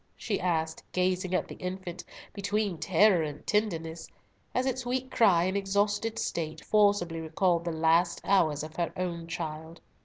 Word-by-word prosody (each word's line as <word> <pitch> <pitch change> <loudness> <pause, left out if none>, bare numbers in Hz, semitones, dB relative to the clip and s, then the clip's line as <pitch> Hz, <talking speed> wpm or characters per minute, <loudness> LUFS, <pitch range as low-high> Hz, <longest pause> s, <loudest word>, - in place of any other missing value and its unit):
she 205 - -2
asked, 160 -3 -1
gazing 185 0 0
at - - 0
the - - -8
infant 180 -1 -5 0.3
between 200 -1 -1
terror 190 +1 +4
and 150 -2 -5
tenderness, 165 -6 -1 0.5
as 255 - +1
its 260 -1 -1
weak 255 +1 -2
cry 185 -7 +4
and 190 +2 0
exhausted 205 +3 0
state 160 -2 -3
forcibly 200 -6 +3
recalled 170 +2 +1
the 170 - -2
last 165 +2 +2
hours 155 -7 +2
of 155 0 -8
her 170 -1 0
own 170 -2 -3
child. 160 0 -6
180 Hz, 155 wpm, -29 LUFS, 165-200 Hz, 0.5 s, terror